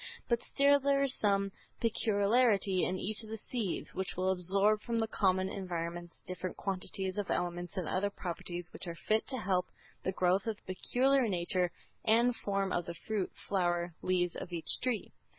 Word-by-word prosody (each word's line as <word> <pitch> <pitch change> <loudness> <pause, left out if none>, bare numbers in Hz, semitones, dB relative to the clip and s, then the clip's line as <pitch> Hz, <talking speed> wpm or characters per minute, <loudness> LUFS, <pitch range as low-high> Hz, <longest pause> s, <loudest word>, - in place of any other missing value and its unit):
But 235 -1 +2
still 280 0 +4
there 280 0 +3
is 270 -2 +2
some 200 -1 +2 0.3
peculiarity 210 -3 +3
in 185 - -1
each 215 +3 -1
of 220 - -8
the 220 - -4
seeds, 220 -4 -3
which 190 -1 -3
will 185 +1 +2
absorb 195 +4 +2
from 230 +1 -2
the 225 - +2
common 190 -3 +2
environments 175 -3 -4
different 185 0 -5
quantities 190 0 -2
of 200 - -3
elements 175 +1 -2
and 180 -4 -1
other 195 +4 +1
properties 175 -2 -5
which - - -6
are 170 - -4
fit 215 +5 +1
to 260 - -2
help 185 -4 +1 0.3
the 190 - -1
growth 185 +3 +2
of 220 - 0
the 185 - -3
peculiar 260 +5 +3
nature 180 -1 +1 0.3
and 235 +2 +4
form 195 -3 -1
of 175 - -1
the 170 - -4
fruit, 210 -1 -2 0.2
flower, 175 -3 +1
leaves 180 -1 +1
of 175 - -6
each 170 -2 -1
tree. 250 -4 -1
195 Hz, 180 wpm, -33 LUFS, 180-220 Hz, 0.3 s, still